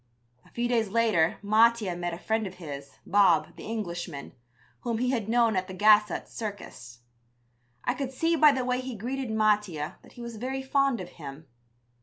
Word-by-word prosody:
A -, -, -21 dB
few 240 Hz, 0 st, -2 dB
days 230 Hz, -4 st, +1 dB
later 215 Hz, -7 st, +2 dB
Mattia 215 Hz, -2 st, +3 dB
met 175 Hz, 0 st, -3 dB
a 170 Hz, -, -5 dB
friend 220 Hz, +2 st, -1 dB
of 185 Hz, -, -9 dB
his, 140 Hz, -5 st, -9 dB
Bob, 185 Hz, -5 st, +3 dB
the -, -, -10 dB
Englishman, 175 Hz, -9 st, -5 dB, 0.5 s
whom 235 Hz, -2 st, -2 dB
he 250 Hz, +2 st, +1 dB
had 225 Hz, -5 st, -2 dB
known 230 Hz, -2 st, +3 dB
at 185 Hz, 0 st, -1 dB
the 190 Hz, -, -7 dB
Gassot 210 Hz, +1 st, +4 dB
Circus. 120 Hz, -, -8 dB, 0.8 s
I -, -, +1 dB
could 270 Hz, -2 st, -4 dB
see 330 Hz, +5 st, +1 dB
by 300 Hz, -1 st, +7 dB
the 260 Hz, -2 st, -1 dB
way 250 Hz, 0 st, 0 dB
he 255 Hz, -2 st, -6 dB
greeted 255 Hz, +4 st, -4 dB
Mattia 210 Hz, -8 st, 0 dB
that -, -, -18 dB
he 240 Hz, -, -11 dB
was 235 Hz, -2 st, -7 dB
very 265 Hz, +4 st, -3 dB
fond 275 Hz, -4 st, +1 dB
of 180 Hz, -, -8 dB
him. 150 Hz, -2 st, -10 dB
215 Hz, 185 wpm, -28 LUFS, 180-240 Hz, 0.8 s, by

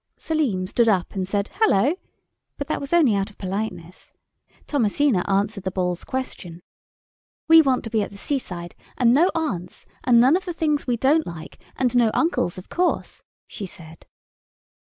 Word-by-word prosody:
Selim 270 Hz, -13 st, -1 dB
stood 230 Hz, +4 st, +2 dB
up, 185 Hz, -4 st, 0 dB
and 190 Hz, -2 st, -3 dB
said, 200 Hz, +1 st, -1 dB
"Halloa"; 310 Hz, -, +2 dB, 0.6 s
but 285 Hz, -, -4 dB
that -, -, -3 dB
was 280 Hz, -, -6 dB
only 320 Hz, -10 st, +4 dB
out 200 Hz, +1 st, -1 dB
of 205 Hz, -, -20 dB
politeness. 185 Hz, -3 st, -5 dB, 0.5 s
Thomasina 250 Hz, -5 st, +1 dB
answered 200 Hz, +1 st, 0 dB
the 190 Hz, -, -1 dB
Ball's 180 Hz, -1 st, -2 dB
question. 180 Hz, -10 st, -6 dB, 0.8 s
"We 325 Hz, 0 st, +8 dB
want 265 Hz, -4 st, +1 dB
to 225 Hz, -, -7 dB
be 220 Hz, -2 st, +1 dB
at 200 Hz, -, -3 dB
the 200 Hz, -, -13 dB
seaside—and 230 Hz, -, -2 dB
no 330 Hz, +8 st, +4 dB
aunts—and 235 Hz, -, -1 dB
none 260 Hz, +6 st, +5 dB
of 370 Hz, -, -2 dB
the 350 Hz, -, -4 dB
things 300 Hz, -4 st, 0 dB
we 245 Hz, -1 st, +1 dB
don't 295 Hz, +6 st, +2 dB
like—and 200 Hz, +9 st, -5 dB
no 240 Hz, -2 st, +4 dB
uncles, 325 Hz, -, 0 dB
of 185 Hz, -, -9 dB
course," 360 Hz, 0 st, -1 dB, 0.2 s
she 200 Hz, -, -7 dB
said. 165 Hz, -3 st, -13 dB
225 Hz, 160 wpm, -23 LUFS, 185-285 Hz, 0.8 s, We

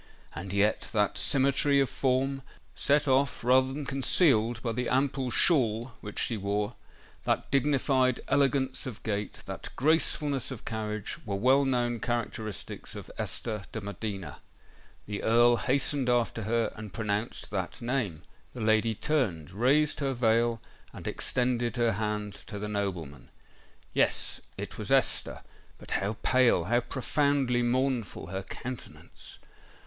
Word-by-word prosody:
And 90 Hz, +4 st, -6 dB
yet 100 Hz, +2 st, +1 dB
that 105 Hz, -2 st, +2 dB
symmetry 140 Hz, +1 st, +3 dB
of 135 Hz, -, +3 dB
form, 135 Hz, +1 st, 0 dB, 0.3 s
set 145 Hz, +1 st, +2 dB
off 135 Hz, -1 st, +2 dB
rather 130 Hz, +2 st, +4 dB
than 145 Hz, +1 st, -5 dB
concealed 130 Hz, -4 st, +3 dB
by 115 Hz, -, 0 dB
the 125 Hz, +2 st, -2 dB
ample 135 Hz, 0 st, +1 dB
shawl 120 Hz, -5 st, +2 dB
which 105 Hz, -1 st, -8 dB
she 115 Hz, -, 0 dB
wore,—that 105 Hz, +3 st, -3 dB
dignified 135 Hz, -2 st, +2 dB
elegance 135 Hz, -1 st, +1 dB
of 120 Hz, -5 st, -8 dB
gait,—that 105 Hz, -2 st, -4 dB
gracefulness 145 Hz, -2 st, +2 dB
of 130 Hz, -5 st, -8 dB
carriage, 110 Hz, -2 st, -4 dB
were 100 Hz, -2 st, -3 dB
well 130 Hz, +7 st, +4 dB
known 120 Hz, -3 st, 0 dB
characteristics 115 Hz, -2 st, -3 dB
of -, -, -8 dB
Esther 105 Hz, -3 st, -2 dB
de 110 Hz, -, -4 dB
Medina. 100 Hz, -, -5 dB, 0.7 s
The 105 Hz, 0 st, -4 dB
Earl 120 Hz, +1 st, +5 dB
hastened 135 Hz, 0 st, +1 dB
after 120 Hz, -2 st, +1 dB
her, 115 Hz, +1 st, +1 dB
and 110 Hz, -2 st, -8 dB
pronounced 105 Hz, +1 st, -3 dB
that 95 Hz, -3 st, -3 dB
name. 120 Hz, -, -2 dB, 0.3 s
The 120 Hz, -, -5 dB
lady 110 Hz, +1 st, +2 dB
turned—raised 125 Hz, -, +1 dB
her 135 Hz, -2 st, -1 dB
veil—and 115 Hz, 0 st, -1 dB
extended 125 Hz, -1 st, 0 dB
her 120 Hz, -2 st, +2 dB
hand 105 Hz, -1 st, -2 dB
to 105 Hz, -, -6 dB
the 105 Hz, +1 st, -4 dB
nobleman. 95 Hz, -9 st, -4 dB, 0.6 s
Yes—it -, -, -1 dB
was -, -, -4 dB
Esther;—but -, -, -1 dB
how 100 Hz, +2 st, -1 dB
pale—how 120 Hz, -4 st, +4 dB
profoundly 135 Hz, 0 st, +1 dB
mournful 125 Hz, -6 st, 0 dB
her 95 Hz, 0 st, -3 dB
countenance! 125 Hz, +5 st, -8 dB
120 Hz, 125 wpm, -29 LUFS, 105-135 Hz, 0.7 s, Earl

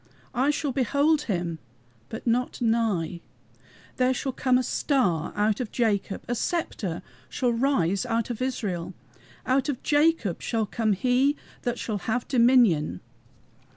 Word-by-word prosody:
I 260 Hz, +3 st, +2 dB
shall 295 Hz, -1 st, 0 dB
behold 285 Hz, +5 st, +2 dB
HIM, 175 Hz, -4 st, -2 dB, 0.5 s
but 220 Hz, -, -7 dB
not 245 Hz, +1 st, 0 dB
nigh. 220 Hz, -8 st, 0 dB, 0.8 s
There 255 Hz, 0 st, +2 dB
shall 265 Hz, +1 st, -2 dB
come 255 Hz, 0 st, +2 dB
a 255 Hz, -, +1 dB
STAR 200 Hz, -, 0 dB
out 210 Hz, 0 st, +1 dB
of 245 Hz, -5 st, -4 dB
Jacob, 205 Hz, -4 st, 0 dB
A 245 Hz, -, -1 dB
sceptre 220 Hz, -, -2 dB, 0.3 s
shall 245 Hz, -2 st, 0 dB
rise 230 Hz, -7 st, +1 dB
out 230 Hz, 0 st, -1 dB
of 240 Hz, -, -5 dB
Israel. 205 Hz, -10 st, -3 dB, 0.5 s
Out 265 Hz, +3 st, +1 dB
of 270 Hz, -, -3 dB
Jacob 295 Hz, -, +2 dB
shall 225 Hz, -2 st, -1 dB
come 215 Hz, +1 st, 0 dB
HE 255 Hz, +7 st, +2 dB, 0.3 s
that 240 Hz, -1 st, -2 dB
shall 215 Hz, -3 st, -3 dB
have 225 Hz, +5 st, -2 dB
dominion!" 235 Hz, -, +4 dB
235 Hz, 140 wpm, -26 LUFS, 205-260 Hz, 0.8 s, dominion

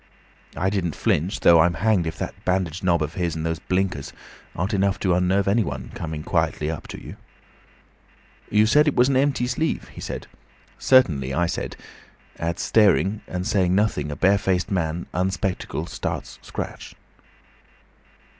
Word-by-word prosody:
I 95 Hz, +2 st, +1 dB
didn't 90 Hz, -6 st, -1 dB
flinch, 90 Hz, +8 st, 0 dB
though 85 Hz, -1 st, +7 dB
I'm 85 Hz, +1 st, +4 dB
hanged 105 Hz, -6 st, +2 dB
if 80 Hz, 0 st, -4 dB
that -, -, -4 dB
bandaged 90 Hz, -1 st, -1 dB
knob 85 Hz, -3 st, +2 dB
of 75 Hz, +2 st, -4 dB
his, 85 Hz, -3 st, -2 dB
and 80 Hz, 0 st, -3 dB
those 80 Hz, -1 st, -1 dB
blinkers, 90 Hz, -5 st, -2 dB, 0.4 s
aren't 95 Hz, +6 st, -2 dB
enough 100 Hz, 0 st, +1 dB
to 95 Hz, -3 st, +2 dB
unnerve 90 Hz, +2 st, +2 dB
any 105 Hz, +4 st, +3 dB
one, 65 Hz, -6 st, -6 dB
coming 80 Hz, -2 st, -5 dB
quietly 75 Hz, 0 st, 0 dB
up 80 Hz, -, -7 dB
to -, -, -8 dB
you. -, -, -10 dB, 1.3 s
"'You 105 Hz, +1 st, +4 dB
said 150 Hz, +7 st, +4 dB
it 150 Hz, -, +2 dB
was 125 Hz, +2 st, +4 dB
an 135 Hz, -, +1 dB
empty 135 Hz, -2 st, +2 dB
sleeve?' 130 Hz, +6 st, -2 dB
he -, -, -11 dB
said. -, -, -5 dB, 0.5 s
'Certainly,' 75 Hz, -, +3 dB
I 85 Hz, -, +2 dB
said. 85 Hz, -, -4 dB, 0.6 s
At 85 Hz, +1 st, -2 dB
staring 105 Hz, -1 st, +3 dB
and 90 Hz, 0 st, -4 dB
saying 95 Hz, -4 st, +2 dB
nothing 100 Hz, -8 st, +1 dB
a -, -, -4 dB
barefaced 95 Hz, +1 st, +2 dB
man, 85 Hz, -2 st, -1 dB
unspectacled, 95 Hz, +1 st, -2 dB
starts -, -, -5 dB
scratch. -, -, -7 dB
90 Hz, 160 wpm, -23 LUFS, 85-100 Hz, 1.3 s, though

